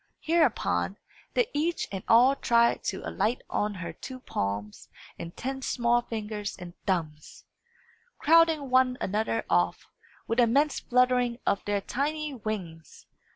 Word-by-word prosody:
Hereupon, 240 Hz, -, +1 dB, 0.4 s
they -, -, +4 dB
each 330 Hz, +4 st, -1 dB
and 195 Hz, -1 st, -5 dB
all 250 Hz, +4 st, +6 dB
tried 235 Hz, -3 st, +2 dB
to -, -, -3 dB
alight 230 Hz, +4 st, -1 dB
on 205 Hz, 0 st, -1 dB
her 180 Hz, -2 st, -6 dB
two 260 Hz, -1 st, -9 dB
palms 105 Hz, -, -4 dB, 0.3 s
and 170 Hz, -, -8 dB
ten 265 Hz, +1 st, -4 dB
small 240 Hz, -2 st, +1 dB
fingers 215 Hz, -2 st, -5 dB
and 175 Hz, -2 st, -9 dB
thumbs, 155 Hz, -5 st, -3 dB, 0.7 s
crowding 320 Hz, -3 st, +4 dB
one 255 Hz, -1 st, +4 dB
another 205 Hz, -, -1 dB
off, 90 Hz, 0 st, +1 dB, 0.4 s
with 230 Hz, +2 st, -1 dB
an 235 Hz, -2 st, +5 dB
immense 285 Hz, +4 st, +2 dB
fluttering 250 Hz, -1 st, +2 dB
of 200 Hz, -, +1 dB
their 205 Hz, -1 st, 0 dB
tiny 300 Hz, +6 st, -2 dB
wings. 195 Hz, -9 st, -6 dB
235 Hz, 135 wpm, -28 LUFS, 190-265 Hz, 0.7 s, all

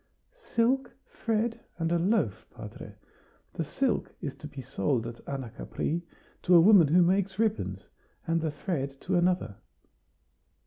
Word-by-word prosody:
"Silk, 265 Hz, -, 0 dB
thread, 225 Hz, 0 st, -1 dB, 0.2 s
and 165 Hz, -1 st, -1 dB
a 170 Hz, -, +2 dB
loaf, 170 Hz, -, 0 dB
padre. -, -, -10 dB, 0.6 s
The 165 Hz, -, -2 dB
silk 255 Hz, -, -1 dB
is 140 Hz, -, -4 dB
to 150 Hz, -, -8 dB
be 140 Hz, -3 st, -9 dB
sold 130 Hz, -1 st, -1 dB
at 115 Hz, 0 st, -8 dB
Anacapri, 140 Hz, +5 st, -3 dB, 0.4 s
to 180 Hz, -, +4 dB
a -, -, +10 dB
woman 180 Hz, -2 st, +7 dB
who 175 Hz, +5 st, +5 dB
makes 190 Hz, +2 st, +1 dB
ribbons, 220 Hz, -1 st, -1 dB, 0.4 s
and 165 Hz, 0 st, +1 dB
the 160 Hz, -, 0 dB
thread 140 Hz, -3 st, -3 dB
to 190 Hz, -, -1 dB
another." 175 Hz, -, +1 dB
175 Hz, 140 wpm, -29 LUFS, 145-215 Hz, 0.6 s, a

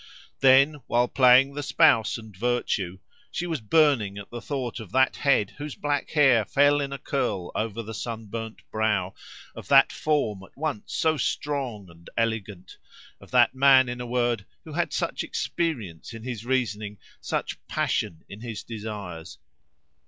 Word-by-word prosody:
Then, 135 Hz, +3 st, +5 dB
while 120 Hz, +1 st, +2 dB
playing 130 Hz, +1 st, +5 dB
the 145 Hz, -, -4 dB
spouse 115 Hz, -5 st, +3 dB
and 110 Hz, -3 st, -12 dB
virtue, 100 Hz, -4 st, -1 dB, 0.3 s
she 175 Hz, -, -3 dB
was 165 Hz, -7 st, -3 dB
burning 110 Hz, -5 st, +3 dB
at 100 Hz, -, -9 dB
the 120 Hz, 0 st, -6 dB
thought 130 Hz, -3 st, -4 dB
of 110 Hz, -5 st, -10 dB
that 130 Hz, 0 st, +3 dB
head 130 Hz, -8 st, +2 dB
whose 145 Hz, -1 st, -5 dB
black 145 Hz, -1 st, -2 dB
hair 135 Hz, -7 st, +4 dB
fell 145 Hz, +6 st, +3 dB
in 140 Hz, -1 st, -3 dB
a 140 Hz, -, -4 dB
curl 100 Hz, -11 st, -2 dB
over 115 Hz, +1 st, -3 dB
the 110 Hz, +1 st, -7 dB
sunburnt 115 Hz, 0 st, -6 dB
brow, 105 Hz, -4 st, 0 dB, 0.4 s
of -, -, -10 dB
that -, -, +6 dB
form 140 Hz, -11 st, -1 dB
at 95 Hz, -, -16 dB
once 145 Hz, -7 st, -4 dB
so 160 Hz, -1 st, +2 dB
strong 135 Hz, -10 st, -2 dB
and 85 Hz, 0 st, -16 dB
elegant, 105 Hz, -5 st, -3 dB, 0.4 s
of -, -, -16 dB
that 125 Hz, -1 st, +4 dB
man, 130 Hz, -1 st, +6 dB
in 120 Hz, 0 st, -5 dB
a 125 Hz, -, -5 dB
word, 120 Hz, -4 st, 0 dB, 0.2 s
who -, -, -10 dB
had -, -, -1 dB
such -, -, -2 dB
experience 115 Hz, -, -3 dB
in 115 Hz, -, -9 dB
his 120 Hz, -2 st, -6 dB
reasoning, 110 Hz, -5 st, -1 dB, 0.2 s
such -, -, -3 dB
passion 80 Hz, -, -1 dB
in 100 Hz, +2 st, -10 dB
his 115 Hz, -3 st, -6 dB
desires. 105 Hz, -7 st, -7 dB
120 Hz, 160 wpm, -26 LUFS, 105-135 Hz, 0.4 s, that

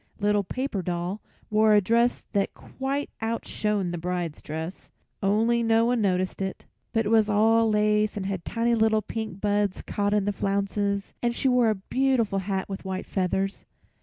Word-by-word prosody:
Little 205 Hz, 0 st, +2 dB
Paper 255 Hz, 0 st, -3 dB
Doll 175 Hz, +3 st, -3 dB, 0.3 s
wore 215 Hz, 0 st, +5 dB
a -, -, +7 dB
dress 235 Hz, +5 st, +2 dB
that 200 Hz, -2 st, 0 dB
quite 275 Hz, +2 st, -4 dB
outshone 210 Hz, -4 st, -1 dB
the 175 Hz, -, -4 dB
bride's 175 Hz, -2 st, -3 dB
dress, 160 Hz, +4 st, -6 dB, 0.3 s
only 225 Hz, +4 st, +2 dB
no 225 Hz, 0 st, +3 dB
one 240 Hz, -1 st, +1 dB
noticed 185 Hz, -1 st, 0 dB
it; 190 Hz, 0 st, -4 dB, 0.3 s
but 225 Hz, -1 st, +1 dB
it -, -, 0 dB
was 220 Hz, -1 st, +4 dB
all 225 Hz, +2 st, +4 dB
lace 210 Hz, 0 st, +2 dB
and 195 Hz, -, -3 dB
had 190 Hz, -3 st, -3 dB
tiny 235 Hz, +1 st, 0 dB
little 220 Hz, -1 st, +3 dB
pink 220 Hz, -4 st, -5 dB
buds 205 Hz, -1 st, 0 dB
caught 205 Hz, 0 st, 0 dB
in 205 Hz, -2 st, +1 dB
the 205 Hz, -, 0 dB
flounces, 200 Hz, 0 st, -1 dB
and 235 Hz, 0 st, 0 dB
she 270 Hz, -, 0 dB
wore 250 Hz, -3 st, +4 dB
a 215 Hz, -, +1 dB
beautiful 230 Hz, 0 st, +1 dB
hat 190 Hz, 0 st, -2 dB
with 195 Hz, -1 st, -6 dB
white 190 Hz, -1 st, -4 dB
feathers. 195 Hz, +1 st, -1 dB
210 Hz, 175 wpm, -26 LUFS, 195-225 Hz, 0.3 s, a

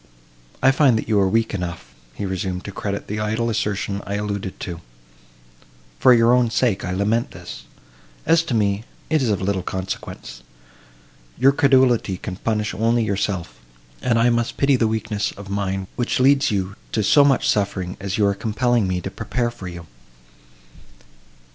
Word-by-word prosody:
"I 135 Hz, -, +7 dB
find 135 Hz, -4 st, +4 dB
that -, -, -4 dB
you 105 Hz, -2 st, +2 dB
are 95 Hz, -1 st, +3 dB
weak 115 Hz, +3 st, +1 dB
enough," 90 Hz, -3 st, -5 dB, 0.2 s
he 100 Hz, -, -4 dB
resumed, 95 Hz, -1 st, -3 dB
"to 100 Hz, -, -5 dB
credit 100 Hz, 0 st, -4 dB
the 105 Hz, +1 st, -4 dB
idle 110 Hz, +2 st, -1 dB
assertion 100 Hz, -1 st, -2 dB
I 100 Hz, -, -4 dB
alluded 100 Hz, -2 st, -4 dB
to! 85 Hz, -3 st, -6 dB, 1.2 s
For 130 Hz, -, +6 dB
your 120 Hz, 0 st, +5 dB
own 125 Hz, -2 st, +3 dB
sake 110 Hz, -4 st, +1 dB
I -, -, -3 dB
lament 105 Hz, +5 st, 0 dB
this; -, -, -10 dB, 0.6 s
as 165 Hz, +1 st, +4 dB
to 130 Hz, -, -1 dB
me, 100 Hz, -1 st, +1 dB, 0.3 s
it 155 Hz, -2 st, +3 dB
is 125 Hz, -, +1 dB
of 100 Hz, -2 st, 0 dB
little 95 Hz, -1 st, 0 dB
consequence. 90 Hz, -10 st, -6 dB, 1.0 s
Your 135 Hz, +3 st, +5 dB
credulity 130 Hz, -8 st, +3 dB
can 90 Hz, 0 st, -6 dB
punish 105 Hz, -1 st, -1 dB
only 115 Hz, +4 st, +1 dB
yourself; 95 Hz, -, -2 dB, 0.4 s
and 120 Hz, -2 st, +1 dB
I 120 Hz, +1 st, +4 dB
must 120 Hz, 0 st, -1 dB
pity 140 Hz, 0 st, +3 dB
the 115 Hz, -3 st, +2 dB
weakness 110 Hz, -1 st, -2 dB
of 100 Hz, 0 st, -10 dB
mind, 95 Hz, -1 st, -2 dB
which 120 Hz, -, -1 dB
leads 135 Hz, +1 st, +4 dB
you 100 Hz, -2 st, -2 dB, 0.2 s
to 110 Hz, -, +1 dB
so 105 Hz, +8 st, +6 dB
much 140 Hz, -1 st, +3 dB
suffering 95 Hz, -3 st, 0 dB
as 100 Hz, 0 st, -3 dB
you 105 Hz, -, +3 dB
are 100 Hz, -, +3 dB
compelling 110 Hz, +2 st, 0 dB
me 90 Hz, -1 st, -1 dB
to -, -, -5 dB
prepare 120 Hz, -1 st, -2 dB
for 110 Hz, -6 st, -9 dB
you." 85 Hz, -1 st, -8 dB
105 Hz, 175 wpm, -22 LUFS, 95-120 Hz, 1.2 s, I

